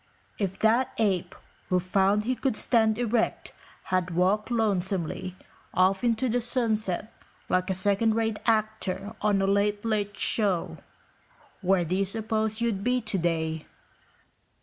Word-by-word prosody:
If 195 -2 -2
that 230 +4 +2
ape 195 -6 0 0.3
who 180 - +3
found 195 +3 +2
he 250 +4 0
could 260 -4 -1
stand 220 -3 +2
erect 235 -1 -1 0.4
had 185 -1 +1
walked 195 +5 +2
lonesomely 190 -5 -1 0.4
off 190 +2 +3
into 240 +2 +1
the 245 +1 +1
sunset 220 -4 -1 0.4
like 185 +1 +1
a 190 - 0
second 205 +4 +2
rate 225 -2 0
actor 215 -2 0
on 205 -2 +2
a - - +3
late, 205 +2 +1
late 205 -2 -1
show, 200 -6 +1 0.8
where 185 -2 +2
do 175 +3 -1
you 195 - +1
suppose 220 +1 -2
you'd 220 -4 0
be 250 +2 +2
today?" 165 -7 -1
205 Hz, 135 wpm, -27 LUFS, 190-225 Hz, 0.8 s, who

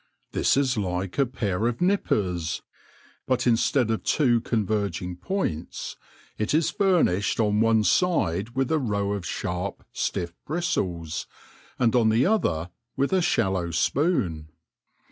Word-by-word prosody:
This - - +2
is 130 -4 +2
like 95 +1 -2
a 135 - +4
pair 110 -3 -1
of 120 -1 -2
nippers, 95 - 0 0.6
but 130 -1 +1
instead 120 0 +2
of 110 - -1
two 120 -6 +3
converging 100 -6 -1
points, 90 - -3 0.4
it 110 +7 +1
is 160 0 +2
furnished 165 - +2
on 105 0 +3
ona 115 -1 +3
side 115 - +1
with 135 +1 0
a 160 - +3
row 100 -6 -1
of 95 -5 -4
sharp, 90 +6 -4
stiff 85 -1 -2
bristles, 90 - -2 0.5
and 120 -1 +2
on 115 -3 +4
the 115 +4 +3
other 90 - +1 0.3
with 140 +6 +1
a 190 - +4
shallow 95 - +1
spoon. 85 - 0
110 Hz, 135 wpm, -25 LUFS, 90-135 Hz, 0.6 s, a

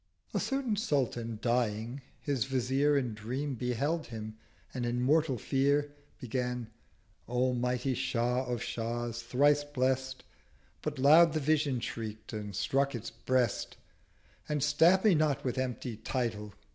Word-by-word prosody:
A - - +1
certain 270 -5 -1
Sultan 120 - -1
dying, 120 +1 0 0.2
his 135 -5 -1
Vizier 135 +2 +2
In 125 -5 -1
Dream 130 +7 -3
beheld 135 +7 -1
him, 110 -1 -7 0.4
and 125 - -3
in 120 0 -1
mortal 145 +1 +2
Fear 140 +5 +1 0.3
Began—'O 125 0 -3
mighty 125 +2 0
Shah 125 0 0
of 125 -1 -2
Shahs! 120 0 -3
Thrice 145 +5 +3
blest'— 130 -2 -1 0.6
But 150 -1 -3
loud 155 +5 +7
the 155 - +1
Vision 145 -3 +1
shriek'd 110 -1 -6
and 105 -2 -5
struck 135 +9 +1
its 115 -1 -6
Breast, 125 -4 0 0.7
And 150 -2 0
'Stab 165 +6 +5
me 210 - +7
not 150 -3 +1
with 125 0 -1
empty 125 -2 -3
Title!' 110 -3 -3
130 Hz, 135 wpm, -31 LUFS, 120-145 Hz, 0.7 s, loud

